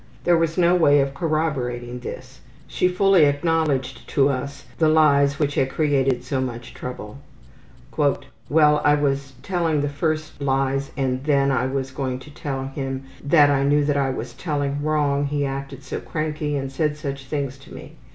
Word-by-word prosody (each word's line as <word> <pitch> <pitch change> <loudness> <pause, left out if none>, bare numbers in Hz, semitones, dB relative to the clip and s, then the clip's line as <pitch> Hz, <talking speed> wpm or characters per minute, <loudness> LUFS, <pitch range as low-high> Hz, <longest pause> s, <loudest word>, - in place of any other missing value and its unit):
There 175 - +4
was 165 0 0
no 175 -1 +4
way 145 -5 +5
of 135 0 0
corroborating 130 -7 -2
this. 125 - -9 0.3
She 180 - +1
fully 185 -2 +4
acknowledged 145 -3 0
to 140 -1 +3
us 140 +1 -4
the 160 -2 +4
lies 140 -3 +4
which 145 -1 0
had 135 -1 +1
created 135 -4 +1
so 130 +1 -2
much 120 -2 -5
trouble. 125 -1 -7 0.8
``Well, 145 +1 +1
I 145 0 +5
was 140 -2 -1
telling 165 -5 0
the 145 - -1
first 155 +1 -3
lies 135 0 0
and 130 -1 -1
then 140 -2 +3
when 135 - +1
I 130 - 0
was 135 0 -3
going 130 -2 -3
to 140 +3 -13
tell 135 -4 -4
him 135 -1 -4 0.2
that 145 0 +5
I 140 -1 +2
knew 145 +1 +3
that 145 -1 +1
I 135 -1 +1
was 125 -2 -5
telling 145 -1 -2
wrong 145 -2 +1
he 145 0 -1
acted 135 0 -5
so - - -5
cranky 155 -1 -3
and 135 -1 -4
said 150 +2 -1
such 140 -3 -5
things 140 -1 -3
to 135 - -16
me. - - -10
140 Hz, 180 wpm, -23 LUFS, 135-150 Hz, 0.8 s, way